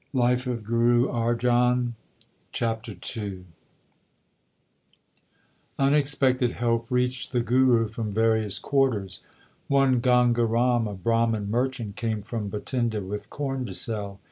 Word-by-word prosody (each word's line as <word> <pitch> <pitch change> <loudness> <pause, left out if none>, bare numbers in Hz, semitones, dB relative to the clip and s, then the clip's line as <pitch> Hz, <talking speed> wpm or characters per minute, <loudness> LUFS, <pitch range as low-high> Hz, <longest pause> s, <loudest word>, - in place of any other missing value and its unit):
LIFE 125 0 +1
OF 120 -3 -3
GURU 120 +3 +2
ARJAN 120 +1 +1 0.6
CHAPTER 115 -2 -3 0.2
II 100 -4 -6 2.3
Unexpected 135 -3 +2
help 115 -1 -1
reached 125 0 -1
the 125 - +1
Guru 120 -1 +3
from 110 -1 -5
various 110 -1 +1
quarters. 115 -10 0 0.5
One 135 -2 +3
Ganga 120 -1 +3
Ram, 120 0 +1
a 105 - -5
Brahman 115 0 0
merchant, 120 -4 -2
came 110 -3 -2
from 110 -2 -4
Bhatinda 115 +1 -2
with 100 +2 -6
corn 135 -2 -3
to 95 - -6
sell. 100 -3 -3
120 Hz, 115 wpm, -25 LUFS, 110-125 Hz, 2.3 s, Guru